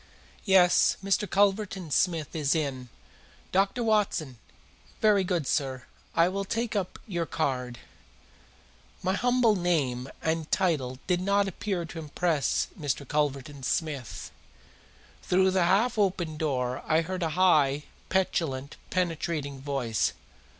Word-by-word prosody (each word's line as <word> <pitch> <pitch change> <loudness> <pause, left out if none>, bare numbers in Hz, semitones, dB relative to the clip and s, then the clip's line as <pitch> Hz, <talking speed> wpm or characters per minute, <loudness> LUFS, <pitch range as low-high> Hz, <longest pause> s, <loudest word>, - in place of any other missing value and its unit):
"Yes, 190 -3 +5
Mr. 195 0 +1
Culverton 195 -3 +1
Smith 165 -2 +1
is 150 -2 +1
in. 135 -5 -2 0.6
Dr. 195 +5 +1
Watson! 200 - 0 0.6
Very 210 -3 +4
good, 180 -5 -1
sir, 130 -2 -1 0.3
I 170 - +5
will 195 +2 -2
take 230 +2 -2
up 190 -3 -2
your 170 -5 -2
card." 125 -5 -2 1.3
My 185 +1 +1
humble 245 0 +3
name 145 -9 0
and 160 -1 -1
title 150 -9 +1
did 180 -1 +1
not 200 +1 +2
appear 190 -1 -3
to 165 0 -8
impress 155 0 0
Mr. 140 -2 -2
Culverton 145 -1 -1
Smith. 140 -2 -3 0.9
Through 190 +1 +3
the 185 -2 +2
half 220 +6 +2
open 180 -5 0
door 130 -4 -1
I 160 +1 +3
heard 185 +2 -4
a 165 - 0
high, 150 -6 +4 0.3
petulant, 150 -7 -1
penetrating 160 -6 -2
voice. 135 -6 -1
165 Hz, 120 wpm, -28 LUFS, 140-190 Hz, 1.3 s, Yes